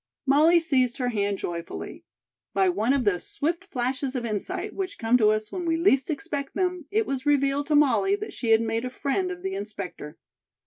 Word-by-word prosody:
Molly 310 +5 +5
seized 260 -7 +1
her 250 -3 0
hand 205 -3 0
joyfully. 170 -2 -6 0.5
By 380 -1 +4
one 250 -8 +1
of 275 -2 +2
those 200 -5 0
swift 335 +6 -2
flashes 260 -3 -2
of 245 -2 -2
insight 210 -3 -3
which 385 0 -4
come 225 +2 +2
to 215 -2 +5
us 215 0 -1
when 365 - -4
we 330 -1 +1
least 275 -7 +3
expect 290 -2 -4
them, 360 -4 -1
it 440 +2 +1
was 275 -2 -3
revealed 280 0 +2
to 300 - +2
Molly 300 +7 +4
that 420 +1 -7
she 235 - -3
had 225 0 +6
made 225 +1 -1
a 255 - -3
friend 280 +8 -1
of 360 0 -7
the 385 0 -2
inspector. 200 - -6
275 Hz, 205 wpm, -26 LUFS, 225-340 Hz, 0.5 s, had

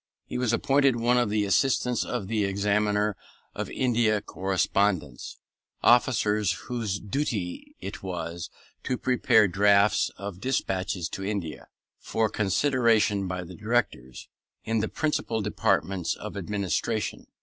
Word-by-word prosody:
He - - -4
was 125 -3 +1
appointed 135 +2 +3
one 120 +1 +2
of 120 -3 +1
the 105 0 +1
Assistants 125 +3 +2
of 95 - -4
the 110 0 0
Examiner 105 +1 +1 0.4
of - - -4
India 115 -4 +1
Correspondence; 95 -6 -1 0.5
officers 105 -5 +3
whose 110 -1 -3
duty 105 -6 -3
it 95 +1 -6
was 85 -2 -5 0.3
to 125 - -1
prepare 110 -4 +3
drafts 100 +2 +3
of 100 -1 -7
despatches 95 -8 -1
to 95 - -6
India, 95 -8 -4 0.3
for 110 -1 0
consideration 110 -2 +2
by 90 -1 -3
the 90 +1 -10
Directors, 105 - -2 0.4
in 115 0 0
the 110 - -1
principal 150 -7 -1
departments 100 -3 0
of - - -8
administration. 105 +2 -2
105 Hz, 125 wpm, -27 LUFS, 95-115 Hz, 0.5 s, appointed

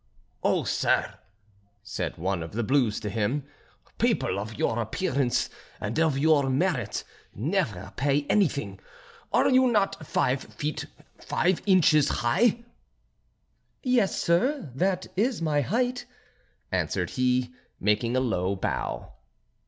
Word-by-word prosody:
"Oh, - - +2
sir," - - 0 0.6
said 105 - -4
one 95 +1 -1
of 80 +2 -7
the 120 +2 -1
blues 125 -3 +2
to 105 - -4
him, 115 +7 -1 0.5
"people 95 - +1
of 110 +2 -6
your 110 +2 0
appearance 130 - 0 0.3
and 105 +8 -2
of 160 -4 +2
your 145 -2 +3
merit 130 - 0 0.3
never - - -2
pay 140 +1 +1
anything: 160 -9 +1 0.5
are - - +4
you 260 0 +5
not 195 -8 0
five 130 +1 +1
feet 150 +1 -4 0.3
five 180 +1 0
inches 155 -6 +5 0.2
high?" 230 - +3 1.2
"Yes, 245 -6 +2
sir, 180 - +1
that 185 +6 0
is 225 +4 +1
my 155 -3 +1
height," 245 - -1 0.7
answered - - -1
he, 125 -1 +1 0.3
making 110 +4 +1
a - - +2
low 100 -6 0
bow. 95 - -3
145 Hz, 120 wpm, -27 LUFS, 120-185 Hz, 1.2 s, you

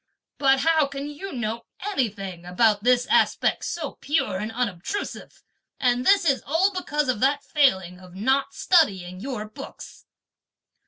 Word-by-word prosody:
But 270 -1 +4
how 320 -1 +3
can 280 0 -6
you 300 +7 -7
know 230 -2 -4
anything 200 - -3
about 205 +3 +2
this 245 0 +3
aspect - - +2
so 315 -5 -4
pure 285 -10 0
and 215 +2 -4
unobtrusive, 235 - -4 0.4
and 250 -2 +1
this 395 -2 +5
is 275 -4 +2
all 355 +7 +2
because 300 -5 -1
of 255 -4 0
that 280 +3 +2
failing 190 - +1
of 180 -1 -14
not 265 +6 0
studying 190 - +2
your 240 -2 -4
books!" 215 - -11
255 Hz, 145 wpm, -24 LUFS, 205-295 Hz, 0.4 s, this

